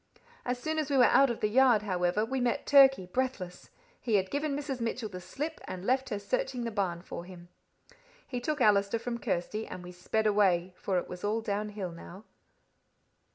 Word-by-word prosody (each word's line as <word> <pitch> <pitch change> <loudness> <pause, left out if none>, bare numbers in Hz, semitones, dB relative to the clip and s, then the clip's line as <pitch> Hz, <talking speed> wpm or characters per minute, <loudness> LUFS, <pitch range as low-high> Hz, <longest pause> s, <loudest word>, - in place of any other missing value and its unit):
As 250 0 -1
soon 315 +5 -2
as 300 -2 -2
we 280 - +2
were 250 - +7
out 275 +2 +5
of 235 - -4
the 210 - +3
yard, 240 -1 +4
however, 185 +1 0
we 260 +2 -2
met 245 +3 0
Turkey, 270 -8 +6
breathless. 185 -4 -3 0.3
He 225 -3 +1
had 190 -1 +1
given 290 0 -1
Mrs. 280 -3 -4
Mitchell 230 -1 -2
the 180 -2 -8
slip, 295 - -5
and 185 +1 -7
left 260 +3 +1
her 210 - -2
searching 265 - -2
the 230 - -3
barn 180 -5 -2
for 170 - -7
him. 175 -1 -12 0.8
He 250 -1 -4
took 295 +2 -2
Allister 200 -1 +4
from 235 +1 -4
Kirsty, 210 +2 -2
and 180 - -8
we 180 - -9
sped 180 +5 -2
away, 190 -4 +2
for 190 0 -1
it 175 - -2
was 180 0 -8
all 210 +2 0
downhill 205 -3 -3
now. 175 +4 -11
215 Hz, 200 wpm, -30 LUFS, 185-260 Hz, 0.8 s, were